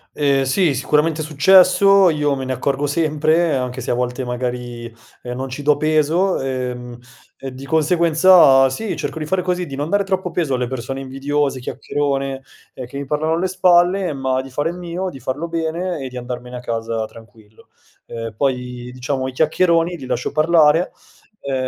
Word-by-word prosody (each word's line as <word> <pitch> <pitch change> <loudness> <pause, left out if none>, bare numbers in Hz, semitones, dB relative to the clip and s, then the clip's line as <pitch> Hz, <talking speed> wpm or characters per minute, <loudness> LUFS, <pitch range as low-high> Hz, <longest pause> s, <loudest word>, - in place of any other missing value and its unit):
Ehm, 140 -2 +2
sì, 145 +3 +2
sicuramente 150 +4 +1
è - - -3
successo, 190 +5 +5
io 150 -2 0
me 135 - -5
ne 130 - -2
accorgo 140 +3 -1
sempre, 155 +1 +1
anche 125 0 -3
se - - -3
a - - +2
volte 125 +1 -2
magari, 125 -1 -4 0.4
ehm, 125 0 -6
non 130 +1 -5
ci 135 +3 -6
do 150 +1 +3
peso, 155 +5 +1
ehm, 125 -2 -4 0.4
e 135 -1 -7
di 135 +1 -9
conseguenza 160 -2 +5
sì, 220 +8 -4
cerco 160 - -4
di 155 - -5
fare 180 +2 0
così, 180 -1 -2
di 135 - -7
non 145 +3 -3
dare 200 +1 +2
troppo 190 -2 -2
peso 160 -6 0
alle 125 0 -1
persone 130 +1 -5
invidiose, 135 +1 -2
chiacchierone, 135 +1 -3 0.3
ehm, 130 - -7
che 140 - -8
mi 140 - -4
parlano 155 +3 -1
alle 180 +3 0
spalle 180 0 +3
ma 130 -1 -1
di 135 - -11
fare 145 +5 -1
il 175 - -9
mio, 180 +1 -4
di 135 - -10
farlo 130 +7 -4
bene 165 +1 -3
e 130 - -5
di 125 - -9
andarmene 125 0 -7
a 125 - -5
casa 115 -1 -3
tranquillo. 110 -1 -17 0.4
Ehm, 115 -1 -6
poi, 125 -1 -2
diciamo, 130 +1 -3
i - - -4
chiacchieroni 170 +3 +2
li 130 - -9
lascio 125 -1 -2
parlare, 155 +1 +3 0.5
uhm, 140 - -4
140 Hz, 185 wpm, -19 LUFS, 130-165 Hz, 0.5 s, successo